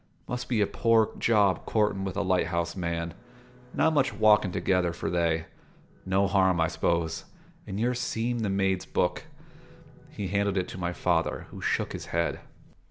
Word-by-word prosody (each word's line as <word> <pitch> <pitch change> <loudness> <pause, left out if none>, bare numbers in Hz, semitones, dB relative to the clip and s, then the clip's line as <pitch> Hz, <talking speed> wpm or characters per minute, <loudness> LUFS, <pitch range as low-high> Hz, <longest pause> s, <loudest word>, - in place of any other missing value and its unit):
"Must 125 0 -4
be 115 -4 +2
a - - +4
poor 115 +1 +2
job 105 -5 +2
courtin' 105 -3 +1
with 95 -1 -4
a 100 - +1
light 95 -3 +1
house 85 -1 -2
man: 85 -2 -3 0.6
not 160 +1 +2
much 145 -3 +2
walkin' 105 -3 +4
together 90 -1 +1
for - - -4
they. 85 -2 +1 0.6
No 95 +1 +3
harm, 95 -2 +3
I 80 +1 +2
s'pose, 85 -2 -1 0.4
in 95 - -4
your 120 +3 +1
seem' 120 -1 -2
the 110 -3 -1
maid's 95 -1 0
book." - - -1 0.8
He 100 -3 -5
handed 100 0 0
it 90 - 0
to 90 - -8
my 90 -1 -1
father, - - 0
who - - -9
shook - - -1
his - - -7
head. 85 0 -1
95 Hz, 170 wpm, -28 LUFS, 85-110 Hz, 0.8 s, a